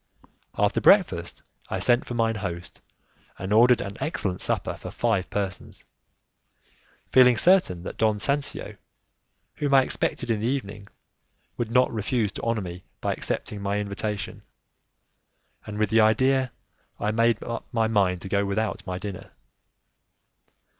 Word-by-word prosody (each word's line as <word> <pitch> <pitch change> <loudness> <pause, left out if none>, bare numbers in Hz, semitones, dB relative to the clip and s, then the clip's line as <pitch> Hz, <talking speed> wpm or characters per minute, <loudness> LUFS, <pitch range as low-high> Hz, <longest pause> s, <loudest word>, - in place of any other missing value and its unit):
After - - +2
breakfast - - +3 0.3
I - - -2
sent 120 0 +2
for 120 - -5
mine 115 -1 +1
host 90 -3 -6 0.6
and 95 +3 -3
ordered 120 +2 +5
an 100 +1 -6
excellent 95 - -2
supper - - 0
for - - -9
five 95 -2 0
persons, 100 -2 -4 1.3
feeling 125 -2 +6
certain 140 - +4
that - - -7
Don 110 -1 +2
Sancio, 140 +8 -2 0.8
whom 140 -2 +1
I 135 - +7
expected 120 - -1
in 110 - 0
the 110 - -1
evening, 105 -6 -4 0.7
would 120 -2 -3
not 125 +1 +3
refuse 110 -1 -1
to - - -7
honour 115 -2 0
me 90 -1 -7 0.2
by - - -1
accepting 105 -1 -3
my 100 +1 -1
invitation, 105 0 -4 1.3
and 105 0 -6
with 105 -1 0
that 115 - +4
idea 130 +4 +3 0.5
I 105 - 0
made 115 0 +2
up 115 - -5
my 115 -3 +1
mind 95 -5 +1
to - - -7
go 100 +1 +1
without 105 +2 -2
my 90 0 -3
dinner. 95 -1 -7
110 Hz, 145 wpm, -25 LUFS, 100-120 Hz, 1.3 s, I